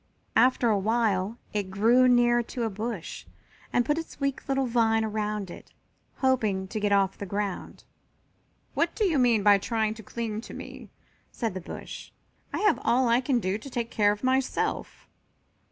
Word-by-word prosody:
After 250 -1 +4
a 205 - +2
while 215 -1 0 0.2
it 205 -3 -2
grew 230 +6 +4
near 240 -1 +4
to 240 +1 -5
a 225 - -1
bush 215 -2 -5 0.4
and 245 - +2
put 295 +2 +1
its 330 - -9
weak 275 -1 -2
little 270 0 +1
vine 225 -2 +2
around 210 -3 -3
it, - - -12 0.4
hoping 215 -8 +1
to 215 - -3
get 205 -1 0
off 195 -1 +2
the 200 - -5
ground. 200 0 -4 0.9
"What - - 0
do 435 - +1
you 325 -7 +2
mean 235 -4 +3
by 205 -1 +6
trying 220 0 0
to 220 - -11
cling 220 0 -4
to - - -10
me?" - - -9 0.4
said 225 -5 -3
the 185 - -5
bush. - - -8 0.4
"I - - -2
have 420 0 +3
all 245 0 +3
I 235 +2 +4
can 255 -1 +1
do 190 0 -1
to 275 - -9
take 235 -2 -3
care 205 -1 +3
of 205 +3 -5
myself." 260 0 -1
225 Hz, 180 wpm, -27 LUFS, 205-245 Hz, 0.9 s, by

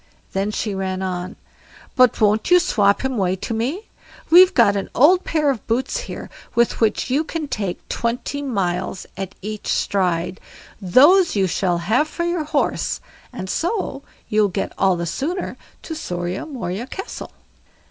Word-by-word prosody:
Then 195 +2 0
she 210 0 -2
ran 190 -1 -3
on: 180 0 -4 0.6
"But 255 -2 +4
won't 215 +4 +2
you 360 - +8
swop 215 - +2
him 265 - 0
away 190 -5 +1
to 190 - -5
me?—we've 345 - +2
got 230 -6 +5
an 195 - -3
old 355 +8 +5
pair 300 -3 +1
of 240 -6 -6
boots 255 - 0
here, - - -6 0.3
with 235 0 +2
which 225 +3 +1
you 285 +4 +2
can 320 -1 -4
take 200 -9 -4
twenty 245 +4 -2
miles 185 -8 -2
at 195 0 -6
each 215 0 -5
stride; 180 -1 0 0.4
those 290 - +5
you 195 -2 +3
shall 180 -1 0
have 245 - +2
for 340 +2 -4
your 345 -2 -1
horse, 300 - 0 0.3
and 235 -7 -6
so 340 - -2 0.3
you'll 210 -1 +3
get 190 - -3
all 190 -2 +3
the 170 0 -3
sooner 320 - -3 0.3
to 325 - -5
SORIA 180 - -4
MORIA 235 - -4
CASTLE." 385 +7 -7
220 Hz, 160 wpm, -21 LUFS, 190-295 Hz, 0.6 s, you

